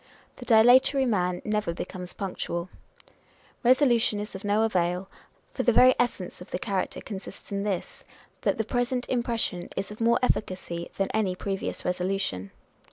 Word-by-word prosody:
The 245 Hz, -, -9 dB
dilatory 245 Hz, +4 st, +6 dB
man 180 Hz, -6 st, 0 dB
never 210 Hz, -5 st, -1 dB
becomes 180 Hz, 0 st, -6 dB
punctual. 180 Hz, -2 st, -4 dB, 0.9 s
Resolution 240 Hz, -4 st, +4 dB
is 210 Hz, +1 st, -6 dB
of 190 Hz, -, -8 dB
no 205 Hz, +2 st, +2 dB
avail; 180 Hz, -3 st, 0 dB, 0.4 s
for -, -, -1 dB
the 245 Hz, -, +4 dB
very 255 Hz, +2 st, +7 dB
essence 230 Hz, -9 st, -1 dB
of 180 Hz, -, -10 dB
the -, -, -2 dB
character 190 Hz, 0 st, -2 dB
consists 195 Hz, -1 st, -9 dB
in 200 Hz, 0 st, -1 dB
this, 200 Hz, -3 st, -3 dB, 0.4 s
that -, -, +1 dB
the 225 Hz, -, +1 dB
present 245 Hz, +2 st, -1 dB
impression 235 Hz, -7 st, -1 dB
is 200 Hz, -, -3 dB
of 210 Hz, -, -9 dB
more 235 Hz, +1 st, +4 dB
efficacy 185 Hz, -7 st, -1 dB
than 195 Hz, -, 0 dB
any 200 Hz, -4 st, +1 dB
previous 195 Hz, +1 st, -4 dB
resolution. 180 Hz, -, -1 dB
205 Hz, 155 wpm, -27 LUFS, 180-235 Hz, 0.9 s, very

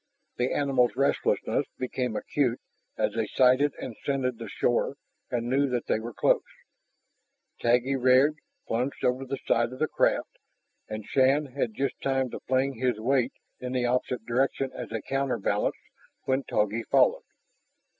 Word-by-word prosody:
The 125 Hz, +1 st, 0 dB
animals' 135 Hz, -4 st, +2 dB
restlessness 140 Hz, +1 st, +1 dB
became 125 Hz, -2 st, -2 dB
acute 125 Hz, -2 st, 0 dB, 0.4 s
as -, -, 0 dB
they 110 Hz, -1 st, -1 dB
sighted 130 Hz, +5 st, +3 dB
and 120 Hz, -, -6 dB
scented 130 Hz, -4 st, -1 dB
the 115 Hz, -3 st, -6 dB
shore 120 Hz, +6 st, 0 dB, 0.3 s
and 120 Hz, -1 st, -2 dB
knew 135 Hz, +2 st, +2 dB
that 125 Hz, -2 st, -1 dB
they -, -, +1 dB
were 115 Hz, +2 st, -6 dB
close. -, -, +3 dB, 1.2 s
Taggi 125 Hz, +3 st, +3 dB
reared, 130 Hz, +4 st, +4 dB, 0.3 s
plunged 125 Hz, +4 st, -2 dB
over 125 Hz, +2 st, +1 dB
the 135 Hz, -, -3 dB
side 115 Hz, +1 st, +2 dB
of -, -, -8 dB
the 155 Hz, -, +1 dB
craft, -, -, 0 dB, 0.5 s
and 110 Hz, -1 st, -5 dB
Shann 135 Hz, +3 st, +3 dB
had 115 Hz, -6 st, -1 dB
just 135 Hz, 0 st, -2 dB
time 135 Hz, -2 st, 0 dB
to -, -, -5 dB
fling 130 Hz, -1 st, +1 dB
his 125 Hz, -4 st, 0 dB
weight 130 Hz, +2 st, +1 dB, 0.3 s
in 125 Hz, 0 st, -5 dB
the 125 Hz, -1 st, +1 dB
opposite 125 Hz, -1 st, -1 dB
direction 130 Hz, +2 st, 0 dB
as 125 Hz, -, -7 dB
a 115 Hz, -2 st, -3 dB
counterbalance 135 Hz, -7 st, 0 dB, 0.5 s
when 130 Hz, 0 st, 0 dB
Togi 105 Hz, +2 st, 0 dB
followed. -, -, +3 dB
125 Hz, 155 wpm, -27 LUFS, 120-135 Hz, 1.2 s, reared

